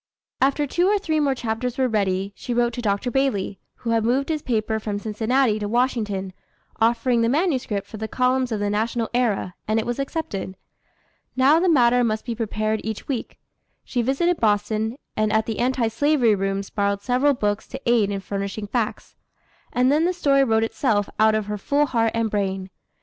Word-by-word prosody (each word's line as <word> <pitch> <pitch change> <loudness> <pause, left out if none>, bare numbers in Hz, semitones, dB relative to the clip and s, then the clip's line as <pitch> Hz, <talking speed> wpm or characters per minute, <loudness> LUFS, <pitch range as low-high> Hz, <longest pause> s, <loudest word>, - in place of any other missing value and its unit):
After 280 +2 +2
two 350 +6 +1
or 415 +1 +3
three 320 -6 -1
more 280 -3 +2
chapters 240 +1 -3
were 260 -1 +2
ready, 200 -3 0
she 240 - -4
wrote 240 0 +2
to 245 - -4
Dr. 210 +3 -1
Bailey, 240 -7 0 0.2
who 230 - -4
had 225 -1 +2
moved 260 +6 +1
his 310 -2 -1
paper 220 -3 -1
from 210 -1 -3
Cincinnati 220 +2 +1
to 205 - -3
Washington, 215 -6 -1 0.5
offering 235 +1 +2
the 230 - +2
manuscript 260 - 0
for 220 - -9
the 220 +1 -4
columns 255 +1 +1
of 215 - -1
the 205 0 -1
National 225 +2 -1
Era, 225 -7 0
and 215 +1 +1
it 220 - -2
was 240 +2 -3
accepted. 270 - -4 0.8
Now 270 +5 +5
the 365 +1 +2
matter 245 -5 +4
must 215 -2 -1
be 240 - -2
prepared 215 -1 -2
each 220 -1 -5
week. 255 -5 -4 0.5
She 245 - -1
visited 295 +8 +1
Boston, 215 +2 0 0.2
and 215 0 +1
at 220 0 +2
the 225 - -4
Anti 250 -1 +1
Slavery 255 -1 +3
rooms 195 0 -2
borrowed 200 -1 -1
several 265 +3 +2
books 205 -3 -1
to 265 - -7
aid 235 -4 +3
in 200 -1 -3
furnishing 200 +2 -4
facts. 225 +1 -3 0.6
And 250 +2 +3
then 310 +3 +3
the 360 - +1
story 275 -5 +3
wrote 225 -3 +2
itself 225 -3 0
out 220 0 +5
of 215 -1 -1
her 210 0 -4
full 285 +7 +2
heart 230 -4 +1
and 225 -2 0
brain. 190 -2 -2
230 Hz, 195 wpm, -23 LUFS, 210-260 Hz, 0.8 s, Now